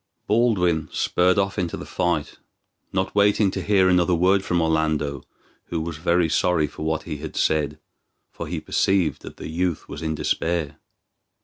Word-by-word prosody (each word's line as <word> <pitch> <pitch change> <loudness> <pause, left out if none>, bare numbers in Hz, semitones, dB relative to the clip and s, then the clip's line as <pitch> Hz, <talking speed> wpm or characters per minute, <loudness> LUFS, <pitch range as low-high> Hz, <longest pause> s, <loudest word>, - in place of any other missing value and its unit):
Baldwin 100 -8 +2
spurred 90 +2 +2
off 100 +1 0
into 85 -2 -2
the - - -7
fight, 85 -3 -2 0.5
not 95 +1 -1
waiting 100 -1 +3
to 95 - -3
hear 95 -1 +3
another 90 -1 +3
word 95 +3 +3
from 90 -2 0
Orlando, 80 -4 0 0.4
who 85 - -3
was 80 -1 -4
very 85 +1 +2
sorry 85 0 +2
for 75 - -10
what 80 0 -1
he 75 - -5
had 75 0 -8
said, 75 -1 +1 0.5
for - - -7
he - - -3
perceived 90 -7 +1
that - - -10
the - - -7
youth 85 +1 -2
was - - -7
in 80 -1 -2
despair. 80 -1 -1
85 Hz, 170 wpm, -23 LUFS, 80-95 Hz, 0.5 s, waiting